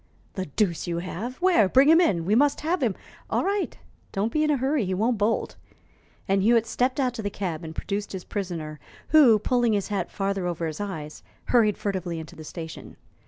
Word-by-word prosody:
"The 190 -2 -4
deuce 170 +3 -1
you 170 -1 -2
have! 190 +8 -5
Where? 335 - +5
Bring 265 +5 +5
him 325 +3 +7
in. 175 - +1
We 200 - +1
must 285 +5 +3
have 325 +2 0
him 225 -7 +1 0.2
" - - -24
"All - - +1
right, 400 +1 -1 0.3
don't 205 +4 -1
be 305 +3 +1
in 305 - +1
a 295 - +3
hurry; 265 0 +1
he 185 -1 -1
won't 225 +3 +1
bolt." 215 +2 0 0.7
And 195 0 +2
Hewitt 230 +2 +4
stepped 250 +4 0
out 255 -3 +1
to 230 - -5
the 205 - -2
cab 180 -5 -4
and 160 0 -7
produced 205 0 -3
his 190 -2 -6
prisoner, 165 -7 -5 0.3
who, 275 -8 +7
pulling 240 +1 +1
his 200 0 -1
hat 205 -2 -2
farther 195 -2 -2
over 170 -1 -2
his 155 +3 -4
eyes, 155 -7 -6 0.3
hurried 220 -4 +4
furtively 185 -4 -3
into 160 - -9
the 160 - -10
station. 160 0 -8
205 Hz, 210 wpm, -25 LUFS, 180-250 Hz, 0.7 s, him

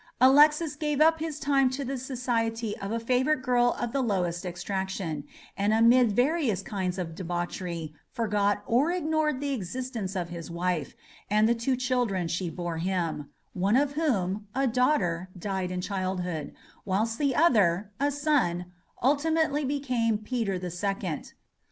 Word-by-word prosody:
Alexis 295 +4 +5
gave 295 -1 -1
up 320 +1 +5
his 310 -2 -4
time 275 -2 +3
to 270 +2 -4
the 270 +2 -3
society 235 -4 -2
of 195 +1 -4
a 230 - 0
favourite 255 +4 +1
girl 245 -2 +3
of 240 -1 -2
the 275 - 0
lowest 180 -6 -1
extraction, 180 -3 -3 0.3
and 205 +2 +2
amid 235 +1 +5
various 245 - +1
kinds 190 -2 -3
of 170 -3 -4
debauchery 175 -2 -4 0.2
forgot 205 -2 0
or 255 +8 +2
ignored 310 -5 0
the 285 0 -2
existence 225 -2 -4
of 175 -2 -2
his 170 -1 -7
wife, 170 -3 -2 0.3
and 215 +2 +4
the 235 - +4
two 235 +3 0
children 245 -8 0
she 175 +1 -2
bore 170 0 -4
him, 165 -5 -2 0.2
one 195 +4 +1
of 280 +1 +3
whom, 210 - -1
a 270 +1 +2
daughter, 220 - +1
died 190 0 -2
in 180 0 -3
childhood; 180 -5 -3 0.3
whilst 220 +5 -1
the 280 -4 +1
other, 210 - +3
a 285 +1 +2
son, 260 - 0 0.3
ultimately 300 +2 +2
became 255 -5 0
Peter 215 -3 -2
the 180 -1 -5
Second. 185 -2 -3
220 Hz, 150 wpm, -28 LUFS, 180-270 Hz, 0.3 s, Alexis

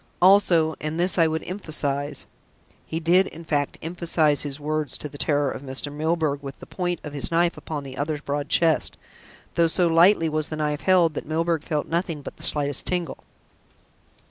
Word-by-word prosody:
Also 175 -4 +5
and 155 +2 -3
this 175 -1 +2
I 165 - +5
would 160 0 -2
emphasise." 145 -6 -2 0.6
He 160 - -3
did, 175 +3 +4
in 165 +1 -10
fact, 145 -2 -1
emphasise 165 -3 +1
his 145 0 -4
words 155 0 -2
to - - -6
the 145 0 -12
terror 145 -3 +2
of - - -7
Mr. 135 +1 -3
Milburgh, 155 -2 -1
with 135 -1 -8
the - - -11
point 175 -2 -3
of 150 - -7
his 140 - -2
knife 170 +1 +2
upon 150 -3 -6
the 135 -1 -8
other's 150 0 -2
broad 145 0 -3
chest, 165 -2 +2 0.6
though 170 -1 +3
so 175 +2 +1
lightly 170 +1 +5
was 155 0 -1
the 155 - -4
knife 150 -1 -1
held 180 -4 +4
that - - -6
Milburgh 165 0 0
felt 150 -2 -2
nothing 165 -3 -2
but - - -9
the - - -15
slightest 145 -2 +1
tingle. 180 -2 -2
155 Hz, 190 wpm, -24 LUFS, 145-170 Hz, 0.6 s, Also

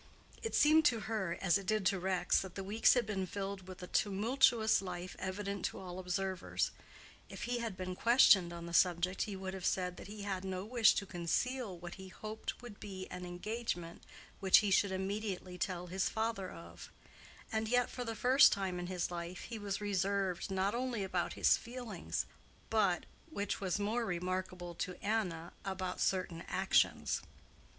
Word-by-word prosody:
It 450 - -2
seemed 310 +2 +6
to 235 -6 +4
her, 195 -5 -2
as 180 -1 +3
it 195 - -10
did 215 -2 +1
to 195 -1 +3
Rex, 180 -1 +2
that 190 -2 -8
the 195 - -4
weeks 210 +6 +4
had 245 -2 +2
been 195 -3 -2
filled 195 -1 -5
with 185 0 -9
a - - -6
tumultuous 220 +3 +3
life 180 -1 -6
evident 200 0 -3
to - - -3
all 185 -1 -7
observers: 185 0 -1 0.6
if - - -7
he 245 0 -1
had 225 -5 -4
been 185 0 -4
questioned 205 -6 +6
on 170 0 -7
the 170 - -7
subject 180 +1 +3
he 205 - -5
would 190 0 -5
have 190 -2 -6
said 180 -1 0
that - - -9
he 205 0 -7
had 195 -2 -2
no 190 0 -3
wish 230 -1 +5
to 200 - -1
conceal 195 +5 -1
what 175 0 -8
he 190 - -8
hoped 215 +5 -6
would 225 -4 -10
be 190 -2 -6
an 180 0 -6
engagement 175 -2 -4 0.4
which 190 -1 +7
he 200 - +1
should 195 0 +4
immediately 190 -1 -3
tell 180 -1 -2
his 185 +2 0
father 220 -4 -2
of: 165 - -10 0.6
and 220 0 0
yet 245 +1 +3
for 250 - -5
the 225 -2 -4
first 260 +5 +7
time 190 -2 -1
in 175 - -4
his 180 -1 -2
life 175 +1 -5
he 230 -2 -6
was 200 -1 -2
reserved 195 -2 0
not 190 +1 +1
only 240 -3 -1
about 185 -2 -1
his - - +4
feelings 235 -7 -4 0.5
but—which 200 0 -1
was 185 -1 0
more 215 +4 0
remarkable 180 -2 -3
to 180 +2 -4
Anna—about 185 -2 -2
certain 185 -3 0
actions. 190 +1 +2
190 Hz, 175 wpm, -35 LUFS, 180-215 Hz, 0.6 s, which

